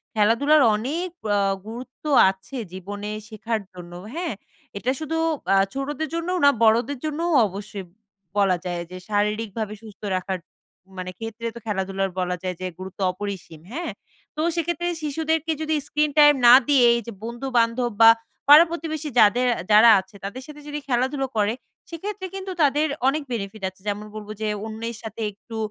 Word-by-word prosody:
খেলাধুলার 235 Hz, +8 st, +4 dB
অনেক 305 Hz, +12 st, -2 dB, 0.2 s
অ্যা 205 Hz, -1 st, +2 dB, 0.3 s
গুরুত্ব 250 Hz, +3 st, -9 dB, 0.3 s
আছে 190 Hz, +8 st, -7 dB, 0.2 s
জীবনে 205 Hz, +3 st, -6 dB, 0.2 s
শেখার 220 Hz, +1 st, -3 dB
জন্য। 175 Hz, -1 st, -10 dB, 0.2 s
হ্যাঁ? 335 Hz, -5 st, -2 dB, 0.4 s
এটা 245 Hz, +5 st, 0 dB
শুধু 315 Hz, +1 st, -3 dB, 0.4 s
আ -, -, +5 dB, 0.2 s
ছোটোদের 290 Hz, +3 st, -3 dB
জন্যও 340 Hz, +2 st, -1 dB
না 285 Hz, -, +9 dB
বড়োদের 235 Hz, +5 st, +3 dB
জন্যও 315 Hz, +3 st, -1 dB, 0.2 s
অবশ্যই 200 Hz, 0 st, -7 dB, 0.5 s
বলা 195 Hz, -3 st, +3 dB
যায়, 175 Hz, -1 st, -2 dB
যে 185 Hz, -, -7 dB
শারীরিকভাবে 210 Hz, +1 st, -1 dB
সুস্থ 215 Hz, -3 st, -14 dB
রাখার, 185 Hz, 0 st, -2 dB, 0.6 s
মানে 185 Hz, 0 st, -5 dB
ক্ষেত্রে 225 Hz, +1 st, -5 dB
তো 235 Hz, -, -7 dB
খেলাধুলার 195 Hz, -2 st, -1 dB
বলা 180 Hz, 0 st, 0 dB
যায় 185 Hz, -1 st, -2 dB
যে 185 Hz, -, -2 dB
গুরুত্ব 190 Hz, +1 st, -9 dB
অপরিসীম। 185 Hz, -5 st, -7 dB
হ্যাঁ? 340 Hz, +6 st, -3 dB, 0.4 s
তো 305 Hz, -, -2 dB
সেক্ষেত্রে 345 Hz, +1 st, -1 dB, 0.2 s
শিশুদেরকে 320 Hz, +2 st, -1 dB
যদি 315 Hz, 0 st, 0 dB
স্ক্রিন 300 Hz, 0 st, +1 dB
টাইম 295 Hz, 0 st, +8 dB
না 240 Hz, -, +10 dB
দিয়ে, 270 Hz, -4 st, +5 dB
এই 235 Hz, -, +1 dB
যে 235 Hz, -, -4 dB
বন্ধুবান্ধব 240 Hz, 0 st, 0 dB
বা 225 Hz, -, +10 dB, 0.4 s
পাড়া 305 Hz, +3 st, +10 dB
প্রতিবেশী 315 Hz, -2 st, -4 dB
যাদের 240 Hz, +4 st, +5 dB, 0.2 s
যারা 215 Hz, +3 st, +8 dB
আছে 190 Hz, +2 st, -11 dB
তাদের 225 Hz, +6 st, -5 dB
সাথে 295 Hz, 0 st, -11 dB
যদি 295 Hz, 0 st, -4 dB
খেলাধুলা 265 Hz, +2 st, 0 dB
করে, 210 Hz, +1 st, +2 dB, 0.4 s
সেক্ষেত্রে 375 Hz, +3 st, -5 dB
কিন্তু 385 Hz, 0 st, -5 dB
তাদের 295 Hz, +2 st, +3 dB, 0.2 s
অনেক 300 Hz, +2 st, +1 dB
benefit 210 Hz, -2 st, -5 dB
আছে। 190 Hz, 0 st, -25 dB
যেমন 205 Hz, +1 st, -2 dB
বলব 210 Hz, -1 st, -8 dB
যে 215 Hz, -, 0 dB, 0.2 s
অন্যের 225 Hz, +1 st, -5 dB
সাথে 220 Hz, 0 st, -7 dB
একটু 220 Hz, +3 st, -10 dB
230 Hz, 160 wpm, -24 LUFS, 205-295 Hz, 0.6 s, না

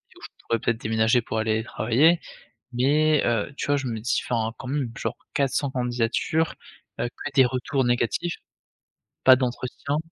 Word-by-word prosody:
Où -, -, -17 dB
je -, -, -8 dB, 0.2 s
pourrais 115 Hz, -1 st, +1 dB
peut-être 115 Hz, -1 st, -1 dB
déménager 110 Hz, +2 st, +2 dB
pour 110 Hz, -, -4 dB
aller 110 Hz, 0 st, 0 dB
travailler, 140 Hz, +10 st, +3 dB, 0.5 s
mais 150 Hz, +4 st, +3 dB
heu, 120 Hz, +3 st, 0 dB
tu -, -, -3 dB
vois 145 Hz, 0 st, +2 dB
je 135 Hz, -, -3 dB
me 115 Hz, -3 st, -3 dB
dis 120 Hz, +4 st, 0 dB
enfin 115 Hz, -2 st, 0 dB
quand -, -, -8 dB
même 135 Hz, -3 st, -1 dB
genre -, -, -3 dB, 0.2 s
400 140 Hz, 0 st, 0 dB
candidatures, 125 Hz, +5 st, 0 dB, 0.5 s
heu, -, -, +1 dB
que 145 Hz, +4 st, -8 dB
des 130 Hz, -, +7 dB
retours 130 Hz, +2 st, -1 dB
négatifs, 120 Hz, +8 st, 0 dB, 0.9 s
pas 130 Hz, -1 st, +9 dB
d'entretien 130 Hz, +3 st, -2 dB
125 Hz, 165 wpm, -25 LUFS, 115-140 Hz, 0.9 s, pas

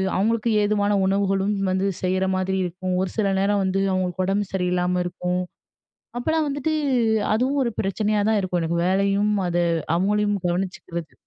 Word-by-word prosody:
அவங்களுக்கு 225 Hz, +3 st, +1 dB
ஏதுவான 205 Hz, 0 st, +1 dB
உணவுகளும் 195 Hz, +1 st, +1 dB, 0.2 s
வந்து 190 Hz, +1 st, 0 dB, 0.2 s
செய்ற 185 Hz, +1 st, +1 dB
மாதிரி 190 Hz, +1 st, -1 dB
இருக்கும். 180 Hz, +1 st, -3 dB
ஒரு 190 Hz, -, -4 dB
சில 200 Hz, -2 st, +2 dB
நேரம் 200 Hz, +1 st, +2 dB
வந்து, 190 Hz, +1 st, 0 dB
அவங்களுக்கு 185 Hz, 0 st, -1 dB
ஒடம்பு 200 Hz, +2 st, 0 dB
சரியில்லாம 180 Hz, -1 st, 0 dB
இருக்கும். 180 Hz, +1 st, -2 dB, 0.8 s
அப்பல்லாம் 315 Hz, +4 st, 0 dB
வந்துட்டு, 285 Hz, +3 st, -1 dB, 0.6 s
அதுவும் 265 Hz, +5 st, +1 dB
ஒரு 235 Hz, -, -1 dB
பிரச்சனையா 210 Hz, +1 st, 0 dB
தான் 215 Hz, -, +3 dB
இருக்கும். 180 Hz, -2 st, -1 dB
எனக்கு 170 Hz, +1 st, -1 dB
வேலையும் 200 Hz, +2 st, +2 dB
அது 175 Hz, 0 st, +1 dB, 0.3 s
அவுங்களயும் 205 Hz, +3 st, +1 dB
கவனிச்சுக்கிறது. 175 Hz, -2 st, -4 dB
195 Hz, 145 wpm, -23 LUFS, 180-210 Hz, 0.8 s, தான்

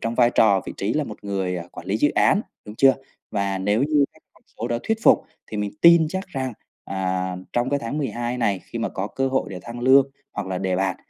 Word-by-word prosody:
trong 115 Hz, +1 st, -2 dB
vai 120 Hz, 0 st, +4 dB
trò 100 Hz, -5 st, +4 dB
vị -, -, -5 dB
trí 100 Hz, +3 st, -1 dB
là 150 Hz, -, 0 dB
một 105 Hz, -4 st, -10 dB
người, 95 Hz, -2 st, -2 dB
ờ, 85 Hz, 0 st, -7 dB
quản 85 Hz, -, -10 dB
lý 100 Hz, -, 0 dB
dự 145 Hz, -, +3 dB
án, 200 Hz, -, +3 dB, 0.2 s
đúng 105 Hz, -, -9 dB
chưa? 135 Hz, +1 st, +6 dB, 0.4 s
Và 100 Hz, -2 st, -1 dB
nếu 105 Hz, +5 st, +1 dB
như 145 Hz, 0 st, +3 dB
các -, -, -24 dB
con -, -, -25 dB, 0.2 s
số -, -, -3 dB
đó 120 Hz, -, 0 dB
thuyết 225 Hz, 0 st, 0 dB
phục, -, -, +5 dB, 0.2 s
thì 110 Hz, -, -6 dB
mình 105 Hz, -1 st, -2 dB
tin 170 Hz, -1 st, +7 dB
chắc 190 Hz, +4 st, -4 dB
rằng, 130 Hz, -6 st, -3 dB, 0.3 s
à, 95 Hz, -1 st, -2 dB, 0.2 s
trong 120 Hz, +2 st, 0 dB
cái 140 Hz, -, +2 dB
tháng 130 Hz, +4 st, -4 dB
12 120 Hz, -3 st, -2 dB
này, 100 Hz, -6 st, +1 dB
khi 115 Hz, -, -7 dB
mà 115 Hz, -, -1 dB
có 95 Hz, -, -4 dB
cơ 135 Hz, +3 st, -1 dB
hội 130 Hz, 0 st, 0 dB
để 95 Hz, -, -6 dB
thăng 120 Hz, +1 st, -8 dB
lương, 135 Hz, +2 st, +5 dB, 0.2 s
hoặc -, -, -4 dB
là 95 Hz, -, -2 dB
đề 95 Hz, -1 st, -1 dB
bạt, 95 Hz, -1 st, 0 dB
115 Hz, 255 wpm, -23 LUFS, 95-135 Hz, 0.4 s, tin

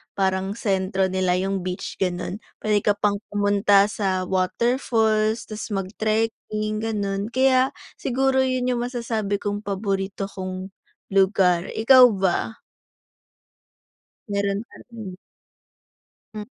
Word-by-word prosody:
parang 190 Hz, 0 st, 0 dB
sentro 190 Hz, -3 st, 0 dB
nila 185 Hz, -1 st, +1 dB
'yung 195 Hz, +1 st, -1 dB
beach, 180 Hz, 0 st, -5 dB
gano'n. 180 Hz, +1 st, -2 dB, 0.2 s
Puwede 210 Hz, -1 st, +3 dB
ka 205 Hz, 0 st, +1 dB
pang 205 Hz, -1 st, 0 dB
pumunta 205 Hz, 0 st, +3 dB
sa 190 Hz, -3 st, -1 dB
waterfalls, 220 Hz, +3 st, +1 dB
tas 215 Hz, 0 st, -6 dB
mag-trekking, 215 Hz, +1 st, -2 dB
gano'n. 205 Hz, -2 st, -2 dB
Kaya 260 Hz, +1 st, +3 dB, 0.3 s
siguro 265 Hz, +1 st, +1 dB
'yun 255 Hz, -1 st, 0 dB
'yung 240 Hz, -1 st, -1 dB
masasabi 230 Hz, -4 st, -2 dB
kong 205 Hz, 0 st, -3 dB
paborito 195 Hz, -1 st, -2 dB
kong 185 Hz, 0 st, -6 dB, 0.4 s
lugar, 190 Hz, -2 st, +3 dB
ikaw 250 Hz, +3 st, +8 dB
ba? 195 Hz, +4 st, 0 dB, 1.7 s
Meron 200 Hz, 0 st, 0 dB
pa -, -, -18 dB
rin. 215 Hz, -6 st, -8 dB, 1.2 s
Hmm. 215 Hz, -, -5 dB
205 Hz, 110 wpm, -23 LUFS, 190-225 Hz, 1.7 s, ikaw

